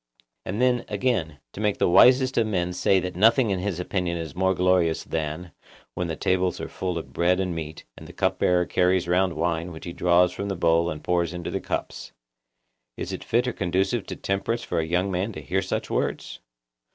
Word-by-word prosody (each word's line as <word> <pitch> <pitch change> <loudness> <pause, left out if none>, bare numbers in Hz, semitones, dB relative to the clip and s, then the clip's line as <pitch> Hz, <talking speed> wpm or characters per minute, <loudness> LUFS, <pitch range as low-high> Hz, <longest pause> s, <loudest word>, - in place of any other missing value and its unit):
And 100 +4 -3
then, 125 -1 +2
again, 90 - -1 0.2
to 105 - -7
make 105 -2 +1
the - - +2
wisest 130 +8 +5
of 110 - +1
men 90 -4 -1
say 95 +2 +3
that 90 -1 -5
nothing 115 +4 +4
in 95 - 0
his 90 -2 -3
opinion 90 -1 -2
is 80 -4 -6
more 95 +2 +1
glorious 90 -3 +2
than 80 +2 -4 0.4
'When 90 - -2
the 80 - -3
tables 90 +2 0
are - - -4
full 90 -2 -3
of 70 -5 -7
bread 90 +4 +2
and 90 -2 -1
meat, 80 -1 -6
and - - -12
the - - -10
cup - - 0
bearer 90 -1 +3
carries 90 0 +1
round 90 0 +2
wine 85 +1 -2
which 80 - -10
he 85 - -6
draws 90 +1 +3
from 100 +2 -5
the 95 - -2
bowl 85 0 +2
and 75 -2 -6
pours 85 -1 0
into 85 -1 -5
the - - -2
cups,' - - -5 0.8
is - - -5
it - - -6
fit 120 +2 +1
or 125 - -1
conducive 95 +5 -1
to - - -5
temperance 105 +4 -2
for 85 - -2
a 80 - -1
young 90 +3 0
man 95 +5 -2
to - - -7
hear 70 - -1
such - - -3
words? - - -2
90 Hz, 215 wpm, -25 LUFS, 85-95 Hz, 0.8 s, wisest